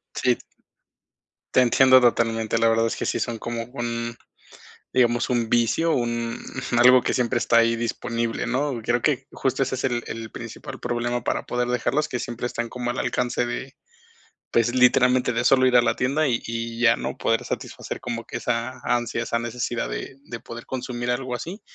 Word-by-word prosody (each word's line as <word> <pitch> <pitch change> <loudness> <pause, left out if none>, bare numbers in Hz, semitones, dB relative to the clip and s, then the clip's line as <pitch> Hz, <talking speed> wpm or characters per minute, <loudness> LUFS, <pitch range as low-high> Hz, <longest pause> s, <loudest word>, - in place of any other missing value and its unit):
Sí. - - +2 1.2
Te - - +5
entiendo 130 +1 +6
totalmente, 115 -2 +1
la 115 0 +4
verdad 115 0 +2
es - - -2
que - - -4
sí - - -1
son 120 -2 -2
como 115 0 -4
un, 120 -1 -3 0.8
digamos, 120 -1 +2
un 120 -2 +1
vicio, 120 +8 +2
un 120 -1 -1 0.4
algo 125 +1 +7
que - - -1
siempre 120 -1 +1
está 115 0 +3
ahí 115 0 +3
disponible, 115 0 -2
¿no?, 130 -1 -1
creo 120 +1 +1
que 135 -3 +1
justo 135 0 -1
ese 130 0 -1
es 130 - -5
el 120 -2 0
el 115 -1 -6
principal - - -8
problema 120 0 -2
para - - -1
poder 125 0 -1
dejarlos, 135 +5 0
que 125 - -3
siempre 120 +1 -4
están 120 -1 -3
como 120 0 -3
al - - -4
alcance 120 0 0
de, 130 +2 -5 0.8
pues, 115 0 +3
literalmente 125 0 +4
de 115 0 0
solo 130 0 +5
ir 125 - +3
a 120 - +7
la - - +1
tienda, 140 +4 +1
y 120 -2 +1
y 115 0 -4
ya, 115 -1 +5
¿no?, - - -4
poder 115 0 +1
satisfacer - - -5
como 115 -1 -4
que - - -6
esa 120 +1 -2
ansia, 120 -1 0
esa 115 0 -1
necesidad 120 0 -3
de - - -5
de 120 -5 -7
poder 115 0 -9
consumir 125 -1 -4
algo 125 0 -2
así. 175 - -6
120 Hz, 190 wpm, -24 LUFS, 115-125 Hz, 1.2 s, algo